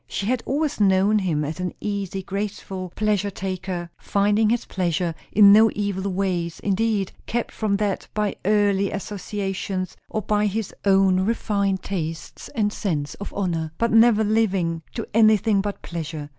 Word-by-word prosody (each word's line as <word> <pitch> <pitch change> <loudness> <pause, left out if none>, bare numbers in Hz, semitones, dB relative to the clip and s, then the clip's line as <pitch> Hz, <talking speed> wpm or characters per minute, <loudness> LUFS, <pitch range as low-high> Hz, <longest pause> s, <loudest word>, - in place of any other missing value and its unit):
She 195 - -3
had 245 +2 0
always 295 -1 -1
known 200 +1 +4
him 160 -6 0
as 155 +4 -5
an 180 0 -3
easy, 200 -2 -3
graceful, 195 -2 -4
pleasure 210 -2 +1
taker; 185 -2 -4
finding 205 +2 +2
his 235 +1 0
pleasure 175 -2 -1 0.2
in 200 -1 +8
no 220 +1 +7
evil 200 -1 -2
ways, 180 -3 -1
indeed; 205 -1 0 0.2
kept 240 0 -2
from 210 -3 0
that 205 -2 -2
by 210 -1 0
early 200 -1 +2
associations, 195 -1 -4
or 215 - -2
by 210 +1 +1
his 210 0 -3
own 195 -1 +4
refined 200 -2 0
tastes 165 -4 -5
and 210 -3 +1
sense 150 -8 -2
of 200 - -5
honour; 165 -5 -2
but 230 0 +1
never 225 -1 +5
living 195 -6 +1
to 230 - -3
anything 215 -2 +4
but 205 0 -5
pleasure. 155 -3 -5
200 Hz, 155 wpm, -23 LUFS, 185-210 Hz, 0.2 s, in